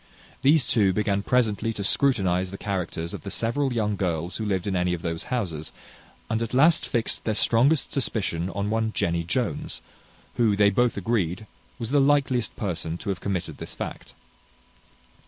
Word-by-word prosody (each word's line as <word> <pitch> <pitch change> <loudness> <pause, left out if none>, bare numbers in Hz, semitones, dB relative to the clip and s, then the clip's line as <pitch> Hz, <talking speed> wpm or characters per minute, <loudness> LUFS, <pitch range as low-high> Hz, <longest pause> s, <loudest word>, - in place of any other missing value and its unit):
These 140 -2 +4
two 100 -5 +3
began 100 0 0
presently 115 -1 +1
to 100 - -4
scrutinize 95 -7 +2
the 100 - -7
characters 90 -5 -3
of - - -6
the 100 - -6
several 130 +7 0
young 105 -3 0
girls 85 -2 -2
who 110 - -3
lived 95 -2 -1
in 100 -2 -1
any 90 0 +1
of 85 - -10
those 85 -1 -3
houses, 85 -11 -3 0.6
and 110 - -1
at 115 +2 -2
last 155 +5 +4
fixed 115 -2 -1
their 110 - -1
strongest 130 +8 +3
suspicion 95 -9 0
on 100 +1 -2
one 110 0 0
Jenny 85 0 0
Jones, 95 - -2 0.6
who, 115 -4 +3
they 100 0 +4
both 120 +3 +2
agreed, 100 -2 -1 0.3
was 115 0 -5
the 145 -1 +4
likeliest 135 -4 +2
person 85 -4 -3
to 100 - -6
have 95 -3 -2
committed 95 -4 -3
this - - -6
fact. - - -7
105 Hz, 175 wpm, -25 LUFS, 90-120 Hz, 0.6 s, These